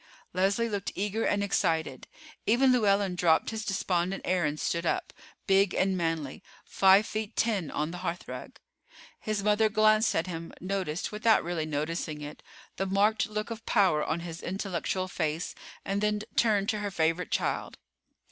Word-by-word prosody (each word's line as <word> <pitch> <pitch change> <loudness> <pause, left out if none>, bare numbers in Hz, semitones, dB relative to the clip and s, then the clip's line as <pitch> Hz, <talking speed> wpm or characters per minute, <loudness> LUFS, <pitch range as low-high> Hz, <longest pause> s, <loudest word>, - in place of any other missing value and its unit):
Leslie 195 +5 +1
looked 200 -3 -3
eager 210 +3 -1
and 205 0 +1
excited. 160 -8 0 0.4
Even 250 +5 +5
Llewellyn 200 -5 +3
dropped 170 0 +2
his 220 -1 -4
despondent 190 -2 -1
air 180 -2 +1
and 150 +1 -2
stood 170 0 -1
up, 170 - -1 0.3
big 195 -1 +3
and 190 0 +2
manly, 165 -5 -2 0.2
five 195 +2 +5
feet 215 0 -4
ten, 205 -9 0
on 155 +2 -2
the 175 - -7
hearthrug. 175 -1 -5 0.6
His 215 -2 -2
mother 210 +1 +3
glanced 215 +1 +3
at 165 - +1
him, 165 -2 -6
noticed, 185 -3 -3
without 215 +1 +3
really 165 -2 -2
noticing 155 +1 -3
it, 150 0 -8 0.4
the 195 - -1
marked 205 +3 +2
look 215 +2 -4
of 225 0 -6
power 175 -7 +3
on 165 +2 -2
his 170 -1 -7
intellectual 185 0 -2
face, 160 -2 -2 0.3
and 200 +1 -1
then 210 0 +1
turned 210 -4 +3
to 215 - 0
her 205 0 -2
favorite 165 0 0
child. - - -2
195 Hz, 160 wpm, -29 LUFS, 170-210 Hz, 0.6 s, Even